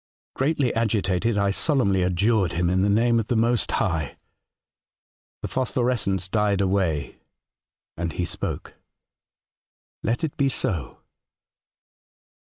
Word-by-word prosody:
Greatly 135 -2 +1
agitated, 110 -1 0
I 100 -1 +2
solemnly 100 - +1
adjured 95 +2 +2
him 85 +1 +1
in 95 +1 +2
the 100 - +2
name 115 +3 +3
of 110 - -3
the 120 - 0
Most 115 +1 +2
High. 80 -5 -1 1.3
The - - -1
phos 130 -1 -1
phorescence 115 -7 0
died 105 0 +1
away 95 -7 0 0.8
and 85 0 -3
he 90 - -2
spoke. - - -5 0.6
' - - -76
Let 115 +6 -1
it 155 - -2
be 140 -1 +2
so 90 - -3
100 Hz, 125 wpm, -24 LUFS, 90-120 Hz, 1.3 s, name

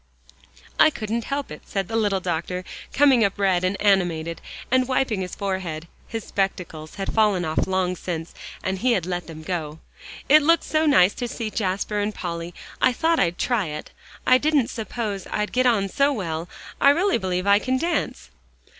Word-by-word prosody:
"I - - +8
couldn't 225 -4 -3
help 280 - -3
it," 150 - -8
said 195 -2 -2
the 225 - -4
little 205 -3 +1
doctor, 180 +1 -3 0.3
coming 270 -4 +5
up 200 -1 0
red 190 -3 +2
and 185 +2 0
animated, 170 -5 +1 0.3
and 255 -1 +3
wiping 255 -6 0
his 180 - -5
forehead. 185 -5 -3 0.2
His 225 -1 -5
spectacles 180 -5 -3
had 195 - -3
fallen 210 -5 +3
off 155 +3 0
long 185 -1 0
since, 170 -2 -5 0.3
and 190 0 -2
he 250 +2 +3
had 185 -7 0
let 175 -1 -3
them 160 -1 -9
go. 155 -3 -4 0.5
"It 305 +2 +7
looked 330 +3 +3
so 310 0 +1
nice 195 -9 +5
to 245 - -4
see 230 -2 -4
Jasper 200 +1 -1
and 205 +1 -2
Polly, 170 -1 -4 0.3
I 255 - +4
thought 325 +5 +1
I'd 175 -1 +1
try 235 -7 0
it. 150 0 -7 0.3
I 255 0 +6
didn't 295 -5 +2
suppose 215 -4 -4
I'd 210 0 -2
get 255 0 +3
on 210 -5 +2
so 280 +8 +2
well; 170 - -3 0.3
I 280 - +7
really 345 +1 +3
believe 185 -1 -2
I 200 0 +5
can 260 +3 0
dance." 340 +5 -2
200 Hz, 185 wpm, -23 LUFS, 180-245 Hz, 0.5 s, I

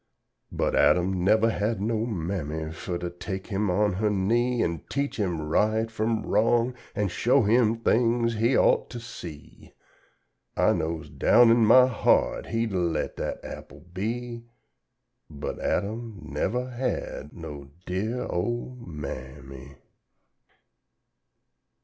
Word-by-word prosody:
But, - - 0
Adam 90 0 +3
nevuh 110 +3 +4
had 110 0 -1
no 110 +2 -1
Mammy 80 -6 -3
fuh 85 +1 -4
to 85 0 -4
take 95 +2 -6
him 105 -1 -1
on 100 +2 +2
her 105 +3 0
knee 115 +5 +1
An' 85 -2 -2
teach 140 +1 -2
him 90 -7 -1
right 110 +9 +1
fum 110 +1 -1
wrong 115 +4 +2 0.2
an' 105 - +1
show 120 +7 +3
him 115 +1 +3
Things 115 0 +2
he 115 +4 +2
ought - - +3
to 120 - -6
see. 85 -10 -11 0.8
I - - +4
knows 80 0 -3
down 120 -1 +5
in 115 0 +5
my 125 +3 +8
heart 125 -4 +1
he'd 115 -1 -1
a 95 - +1
let 85 -3 -1
dat - - -4
apple - - -10
be, 115 +4 -4 0.8
But 75 -2 -6
Adam 110 +1 -2
nevuh 125 +10 -2
had 120 - -3
no 75 -4 -9 0.2
dear 110 +7 -2
old 120 +6 -3
Ma 75 -4 -6
am 65 +1 -9
my. 70 0 -11
105 Hz, 135 wpm, -26 LUFS, 85-115 Hz, 0.8 s, my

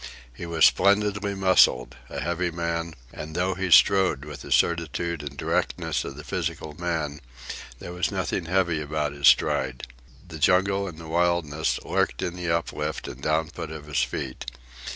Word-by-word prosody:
He 85 +8 -7
was 80 -1 +4
splendidly 100 0 +3
muscled, 95 -10 +4
a - - -5
heavy 85 +1 -1
man, 85 -1 -3 0.2
and 80 +1 -8
though 90 +2 +1
he 95 0 -3
strode 90 -5 +5
with 75 -2 -8
the - - -10
certitude 85 0 +1
and 70 -1 -8
directness - - -1
of 70 - -7
the 75 - -9
physical 75 +1 -4
man, 75 -3 -3 0.6
there 90 - -8
was 90 +1 0
nothing - - -2
heavy 85 -3 +1
about 75 -1 -2
his 70 0 +1
stride. 65 -2 +3 0.4
The 80 - -9
jungle 95 +5 +3
and 85 -4 -8
the 80 0 -10
wilderness 85 -2 0
lurked - - 0
in 90 - -3
the 90 -1 -4
uplift 85 0 -2
and 65 - -9
downput 80 +2 -1
of 75 -2 -8
his 75 -1 0
feet. 65 -2 -4
85 Hz, 165 wpm, -25 LUFS, 75-90 Hz, 0.6 s, strode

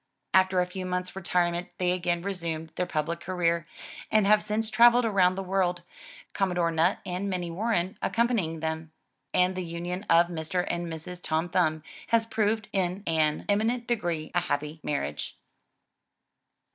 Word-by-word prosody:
After 185 -1 +4
a - - +1
few 185 +1 -6
months' 180 0 -3
retirement 175 -1 0
they 180 -1 +1
again 175 -1 0
resumed 165 -5 -4
their 180 - -1
public 160 +2 -2
career, 170 -2 0 0.4
and 215 -2 +4
have 210 +1 +5
since 215 +1 -1
traveled 240 0 +6
around 185 -4 +3
the 195 - -3
world. 180 -2 0 0.5
Com 195 -1 +1
modore 170 -2 +1
Nutt 165 +5 +3
and 185 +2 -3
Minnie 180 -3 -2
Warren 190 -1 -1
accompanying 215 -9 0
them. 160 0 -3 0.4
And 180 +1 +3
the 185 - -2
union 175 +3 -5
of 170 +1 +6
Mr. 175 +1 -2
and 175 0 -3
Mrs. 165 +2 -7
Tom 160 +2 -1
Thumb 160 -3 +1 0.2
has 230 -1 +3
proved 220 -1 0
in 190 0 -1
an 155 -2 +1
eminent 225 +4 +1
degree 175 -10 -2
a 175 - +3
happy 150 -1 -3
marriage. 75 - -3
180 Hz, 160 wpm, -28 LUFS, 165-195 Hz, 0.5 s, traveled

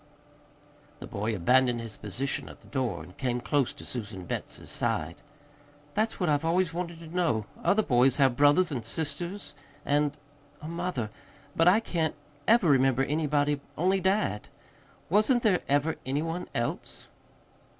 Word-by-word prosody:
The - - -7
boy 105 +2 -2
abandoned 125 +6 +3
his 115 -2 -5
position 130 +7 -2
at - - -13
the - - -19
door, 130 -3 -2
and 90 - -14
came 125 -2 0
close 140 +1 +1
to - - -9
Susan 105 -6 -5
Betts's - - -5
side. 80 +2 -1 0.8
"That's 220 +2 0
what 180 - +1
I've 145 -1 +2
always 170 0 +1
wanted 170 -1 -4
to 165 +1 -10
know. 120 -12 +1 0.2
Other 215 +2 +3
boys 125 -2 +4
have 135 -4 +4
brothers 145 +6 +4
and 125 -5 -3
sisters 160 - -4 0.3
and 145 0 +1 0.4
a 150 - -8
mother. 170 -10 -3 0.4
But 165 - +4
I 200 +5 +6
can't 165 -7 -1 0.3
ever 225 -4 +5
remember 135 -2 +4
anybody 145 -1 +1 0.2
only 185 +4 +2
dad. 190 - 0 0.6
Wasn't 215 - +3
there 195 -6 +3
ever 145 +3 +2
any 140 +4 -1
one 165 +2 -4
else?" 120 0 -4
145 Hz, 150 wpm, -28 LUFS, 125-175 Hz, 0.8 s, I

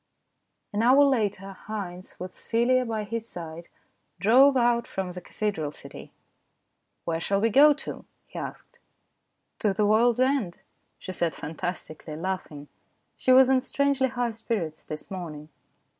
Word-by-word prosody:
An 205 - 0
hour 260 +5 +6
later 205 -8 0
Haynes, 185 -4 -6
with 180 0 -7
Celia 250 +2 +1
by 220 -2 -2
his 230 +2 -5
side, 170 -1 -8 0.5
drove 260 +8 +6
out 235 -1 +2
from 190 -2 -4
the 180 0 -8
cathedral 175 -6 -3
city. - - -12 0.5
" - - -51
Where 165 -1 -1
shall 195 +3 +1
we 225 +2 +2
go 290 +6 +7
to? 290 - -8
" - - -46
he - - -8
asked. - - -8 0.4
" - - -51
To 205 -4 +1
the 210 - +2
world's 225 +3 +4
end," 255 -9 +1 0.4
she 185 - -7
said 170 -2 -1
fantastically, 155 -1 -6
laughing. 160 -4 -5 0.5
She 255 - +1
was 260 0 +8
in 260 -1 +3
strangely 280 0 +1
high 245 -2 -2
spirits 210 -8 -3
this 155 +4 -8
morning. 155 -5 -7
210 Hz, 155 wpm, -26 LUFS, 175-245 Hz, 0.5 s, was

